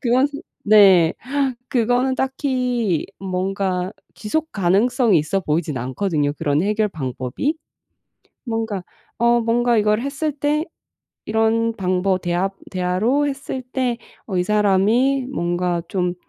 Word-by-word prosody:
그건 255 +2 +3
그 285 - -7 0.3
네. 190 -6 +7 0.6
그거는 245 +2 +2
딱히 250 - -1
뭔가 185 0 -2 0.2
지속 315 +9 -3
가능성이 205 +3 +3
있어 155 +6 -1
보이진 155 -4 -1
않거든요, 145 +3 -1
그런 145 +1 +1
해결 210 +1 +1
방법이? 135 - -3 0.9
뭔가 225 -5 -2 0.3
어 235 0 +3
뭔가 240 +1 +2
이걸 210 +1 +2
했을 280 +4 -2
때 295 +2 0 0.6
이런 225 +1 +1
방버 185 0 +1
대화 175 +2 -1 0.2
대화로 195 +11 +1
했을 270 -1 -5
때 250 -1 -2 0.3
어 190 -4 -3
이 180 - +2
사람이 210 +7 +2
뭔가 175 -4 -1
좀 180 -2 -1
210 Hz, 230 characters per minute, -21 LUFS, 180-250 Hz, 0.9 s, 네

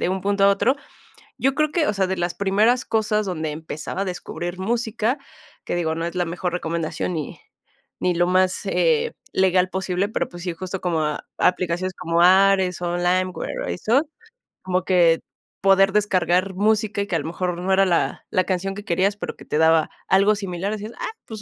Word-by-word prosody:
de - - 0
un 190 0 -2
punto 200 +1 +1
a - - +7
otro. 215 +7 +2 0.6
Yo 270 +1 +2
creo 305 0 +1
que, 315 -3 +1
o - - +1
sea, 195 -1 +1
de 190 0 -2
las 175 0 -1
primeras 210 +5 +2
cosas 215 -1 0
donde 160 -5 -3
empezaba 155 +3 -5
a - - -1
descubrir 175 0 -5
música, 230 +3 -1 0.5
que - - -2
digo, 160 -2 -1
no 165 +1 -3
es 170 - -4
la 180 - 0
mejor 175 +1 -3
recomendación, 170 0 -2
ni 155 -4 -5 0.6
ni 180 -1 +1
lo 175 - +3
más, 185 0 +2
eh, 470 -1 +2 0.2
legal 185 -1 +3
posible, 190 +1 -1
pero - - -1
pues 175 -1 -10
sí, 175 -2 -2
justo 185 +2 -6
como 170 -3 0
a 150 -1 -2
aplicaciones 180 +1 0
como 170 0 0
Ares,o 185 -1 +4
Limeware, 180 +1 -1
o - - -3
eso, 265 - +1 0.5
como 185 -1 0
que 170 -3 +4 0.4
poder 195 0 +5
descargar 190 -2 +1
música 210 +1 +1
y 200 - -3
que 180 - -2
a - - -2
lo - - -6
mejor 175 +1 -2
no 190 +2 0
era 195 +1 +4
la 175 -3 0
la 185 - +2
canción 195 +1 -2
que 205 +1 -8
querías, 190 +4 +1
pero - - -5
que - - -13
te - - -2
daba 160 -1 +4 0.2
algo 200 +3 +4
similar, 195 -1 -3
así 210 -1 -5
es, 225 - -8
ah, 435 - -4
pues 220 -2 -8
185 Hz, 200 wpm, -22 LUFS, 175-200 Hz, 0.6 s, a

